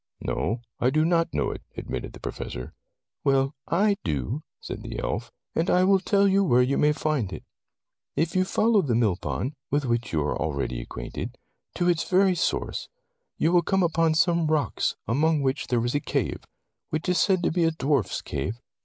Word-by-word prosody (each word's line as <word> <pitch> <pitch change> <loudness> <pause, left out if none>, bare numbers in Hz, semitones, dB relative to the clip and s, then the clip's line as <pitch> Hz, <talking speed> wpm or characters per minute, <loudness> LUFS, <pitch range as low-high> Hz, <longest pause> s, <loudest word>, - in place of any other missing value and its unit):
"No, 115 +2 -2 0.2
I 125 - +3
do 155 +3 +2
not 165 0 +2
know 75 -2 0
it," - - -7 0.2
admitted - - -5
the - - -11
Professor. 60 - -6 0.5
"Well, 135 0 +2
I 200 +4 +2
do," 80 - -2 0.2
said - - -6
the - - -6
elf, - - -3 0.2
"and 165 +3 0
I 180 - +4
will 195 +1 +5
tell 200 +1 +3
you 195 +1 +4
where 125 -8 +4
you 135 +2 +1
may 150 - +4
find 150 -9 -1
it. - - -7 0.7
If 165 +4 0
you 185 - +4
follow 215 +2 +3
the 125 -9 0
mill 110 -6 +3
pond, 125 - -3 0.2
with 145 0 +1
which 120 0 -1
you 80 -2 +1
are 75 - -1
already 70 -5 -2
acquainted, - - -6 0.4
to 175 - +1
its 170 -2 +1
very 190 0 +4
source, 175 - -1 0.5
you 165 - +2
will 175 -1 +5
come 190 +2 +1
upon 165 -1 +2
some 170 -1 +3
rocks 155 -2 0
among 150 +6 +2
which 135 +1 0
there 120 -2 +1
is 120 - 0
a 145 - +2
cave, - - -2 0.4
which 155 +3 -2
is 180 -1 +2
said 185 -3 +3
to - - +2
be 170 +1 +1
a - - +4
dwarf's 140 -5 0
cave. 85 - -3
155 Hz, 195 wpm, -26 LUFS, 120-175 Hz, 0.7 s, will